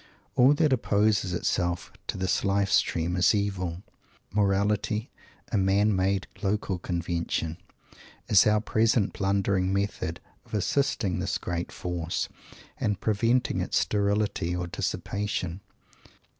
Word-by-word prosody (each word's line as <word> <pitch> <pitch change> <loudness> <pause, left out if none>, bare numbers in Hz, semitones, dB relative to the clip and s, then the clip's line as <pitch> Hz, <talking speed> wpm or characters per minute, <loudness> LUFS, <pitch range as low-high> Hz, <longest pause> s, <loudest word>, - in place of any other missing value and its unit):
All 130 +3 +5
that 150 -2 +3
opposes 105 -5 +2
itself 85 0 -1
to - - -3
this 95 0 0
Life 100 0 +1
stream 85 +2 +2
is 90 +3 +4
evil. 95 -3 -2 0.5
Morality, 105 +2 +1 0.4
a 105 - +2
man 100 +2 +3
made 95 0 +1 0.2
local 100 -2 -1
convention, 85 -2 -2 0.7
is 100 0 +6
our 105 0 +3
present 110 -1 +2
blundering 95 -1 +1
method 100 -4 -2 0.2
of - - -8
assisting 105 -4 0
this 95 +1 -1
great 90 -2 -4
Force, 85 -1 -3 0.5
and 105 -3 0
preventing 115 +4 +1
its - - 0
sterility, 100 -4 0
or 90 0 -2
dissipation. 95 0 -3
100 Hz, 115 wpm, -27 LUFS, 90-105 Hz, 0.7 s, is